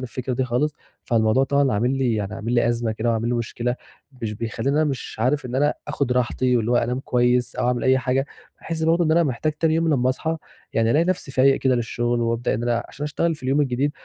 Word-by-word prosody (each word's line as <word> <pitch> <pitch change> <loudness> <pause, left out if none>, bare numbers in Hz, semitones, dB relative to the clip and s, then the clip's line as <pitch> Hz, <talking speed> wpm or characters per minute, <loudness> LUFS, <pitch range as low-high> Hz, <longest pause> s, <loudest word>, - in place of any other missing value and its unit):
الفكرة 130 +1 -4
دي 130 +1 0
خالص، 135 +5 0 0.3
فالموضوع 115 +2 +2
طبعًا 140 -2 +2
عامل 125 +6 +1
لي 125 -4 +1
يعني 105 0 -3
عامل 115 +2 -4
لي 120 -1 +3
أزمة 115 -1 0
كده، 110 +2 -1
وعامل 115 +1 0
لي 120 - 0
مشكلة، 120 +1 -2 0.5
مش 105 -1 -2
بيخلّيني 115 +6 -2
أنا 155 - +3
مش 135 -4 -4
عارف 130 +4 +1
إن 125 - -6
أنا 145 +2 +2
آخُد 130 -3 -1
راحتي 125 0 +1
واللي 115 +1 0
هو 120 - +4
أنام 125 +2 0
كويّس، 125 -1 +1
أو - - 0
أعمل 125 -1 0
أي 130 0 +4
حاجة، 130 +2 0 0.3
باحس 165 -1 -4
برضه 165 +2 +3
إن 155 - +1
أنا 170 +2 +4
محتاج 150 +2 -1
تاني 160 +1 +1
يوم 165 0 +1
لمّا 130 -4 +2
أصحى 160 +5 -1 0.4
يعني 115 0 +2
ألاقي 155 +6 +3
نفسي 180 -6 -1
فايق 135 +1 +4
كده 130 -1 +2
للشغل، 120 0 -1
وابدأ 115 0 0
إن 115 - -3
أنا 120 -1 0
عشان 145 - -7
أشتغل 165 +2 0
في 140 - -13
اليوم 135 +3 +1
الجديد، 135 +1 +1
125 Hz, 235 wpm, -23 LUFS, 120-140 Hz, 0.5 s, هو